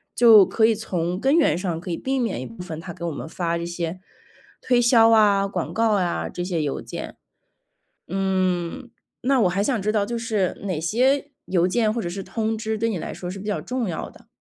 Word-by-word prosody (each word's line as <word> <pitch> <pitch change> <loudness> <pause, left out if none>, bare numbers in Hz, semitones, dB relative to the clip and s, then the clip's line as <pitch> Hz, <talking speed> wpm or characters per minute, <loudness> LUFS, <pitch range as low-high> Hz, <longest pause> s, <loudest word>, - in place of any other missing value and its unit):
就 225 -5 +8
可 220 - +2
以 225 - +3
从 180 -4 -2
根 270 +6 +3
源 315 - +3
上， 175 -3 -2
可 180 - -8
以 165 - -2
避 265 0 -1
免 225 - -1
一 - - -5
部 115 +3 -10
分 160 -3 -6
它 175 0 -8
给 170 - -10
我 170 - -2
们 160 - -6
发 170 0 -2
这 170 - -4
些 170 +1 -4 0.6
推 245 -1 +2
销 230 -1 +6
啊、 205 -3 +4
广 195 - -4
告 225 0 +2
啊 180 -4 0
这 175 - -5
些 175 -3 -1
邮 145 -2 -2
件。 - - -7 0.9
嗯， 190 +4 -1 0.3
那 265 0 +3
我 185 - +4
还 195 +3 0
想 235 -1 0
知 210 +2 0
道， 210 -2 +2
就 235 +3 -3
是， 215 -6 -1
哪 180 -6 -2
些 265 - +1 0.2
邮 180 -2 +2
件 215 +2 +1
或 235 - -2
者 175 - -3
是 195 +2 -5
通 220 +3 -2
知， 220 0 -2
对 230 +2 0
你 205 -6 -2
来 - - -6
说 180 -1 -6
是 195 - -7
比 200 - -8
较 205 - -1
重 250 -4 -3
要 165 - -4
的？ - - -19
200 Hz, 245 characters per minute, -23 LUFS, 175-230 Hz, 0.9 s, 就